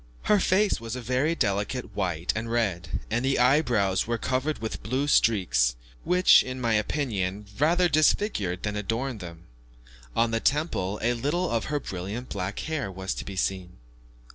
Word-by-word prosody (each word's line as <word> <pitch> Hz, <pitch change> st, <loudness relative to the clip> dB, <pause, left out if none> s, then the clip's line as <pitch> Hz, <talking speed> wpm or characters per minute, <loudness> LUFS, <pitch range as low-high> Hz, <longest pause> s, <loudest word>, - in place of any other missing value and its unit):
Her 210 Hz, -, +4 dB
face 190 Hz, -, +2 dB
was 115 Hz, +1 st, -5 dB
a -, -, -4 dB
very 130 Hz, +7 st, 0 dB
delicate 105 Hz, -, -2 dB
white 90 Hz, -4 st, -1 dB
and 115 Hz, +1 st, -3 dB
red; 95 Hz, -7 st, -1 dB
and 120 Hz, -, 0 dB
the 135 Hz, +1 st, +1 dB
eyebrows 125 Hz, -8 st, +2 dB
were 115 Hz, 0 st, 0 dB
covered 130 Hz, +6 st, -1 dB
with 110 Hz, 0 st, -5 dB
blue 130 Hz, +8 st, -1 dB
streaks, 75 Hz, -, +3 dB, 0.3 s
which, 180 Hz, +1 st, +6 dB
in 130 Hz, 0 st, -5 dB
my 115 Hz, -2 st, +1 dB
opinion, 105 Hz, -4 st, -1 dB
rather 175 Hz, +5 st, +4 dB
disfigured 150 Hz, -, +1 dB
than 105 Hz, 0 st, -2 dB
adorned 115 Hz, +4 st, -2 dB
them. 85 Hz, -2 st, -9 dB, 0.7 s
On 115 Hz, 0 st, +2 dB
the 115 Hz, -, +1 dB
temple 135 Hz, -, 0 dB
a 120 Hz, +2 st, +2 dB
little 150 Hz, +10 st, -1 dB
of 115 Hz, -1 st, 0 dB
her 150 Hz, -1 st, -1 dB
brilliant 100 Hz, +3 st, -6 dB
black 95 Hz, +1 st, -4 dB
hair 155 Hz, -10 st, -3 dB
was 95 Hz, +1 st, -4 dB
to -, -, -6 dB
be 100 Hz, -, -7 dB
seen. 95 Hz, -1 st, -2 dB
115 Hz, 165 wpm, -26 LUFS, 95-135 Hz, 0.7 s, which